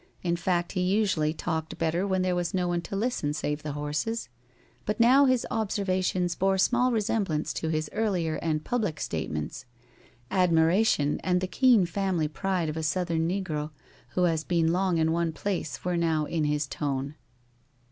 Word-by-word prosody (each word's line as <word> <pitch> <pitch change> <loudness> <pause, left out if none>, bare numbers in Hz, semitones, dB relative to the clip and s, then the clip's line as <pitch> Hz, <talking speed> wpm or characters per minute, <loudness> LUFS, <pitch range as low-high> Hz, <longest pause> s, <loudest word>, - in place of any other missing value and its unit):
In 170 -1 +1
fact, 175 0 0
he 185 - -1
usually 185 -5 +2
talked 160 0 -3
better 165 +4 0
when 190 -1 +1
there 185 -1 +1
was 175 0 -1
no 180 -1 +1
one 175 -1 0
to 195 - -6
listen 200 -9 -1
save 150 -1 -2
the 150 -1 -4
horses. 150 - -3 0.5
But 210 - -2
now 260 +4 +6
his 255 -2 +2
observations 185 -5 0
bore 195 +1 +1
small 250 +6 +3
resemblance 205 -8 0
to 160 - -3
his 155 -1 -1
earlier 185 -8 0
and 155 -2 -1
public 210 -11 -1
statements. 75 - -4 0.7
Admiration 170 -3 +3
and 180 -1 +2
the 185 - -1
keen 235 0 +4
family 175 -2 0
pride 180 +2 -1
of 155 +1 -3
a - - -1
Southern 165 0 0
negro 165 -6 -2 0.5
who 180 - +2
has 165 -3 +1
been 165 -1 +1
long 185 -1 +1
in 160 0 +2
one 165 -1 0
place 165 -7 -3
were 180 -1 0
now 160 -2 +1
in 155 0 -1
his 150 0 0
tone. 140 0 -3
175 Hz, 170 wpm, -27 LUFS, 155-195 Hz, 0.7 s, now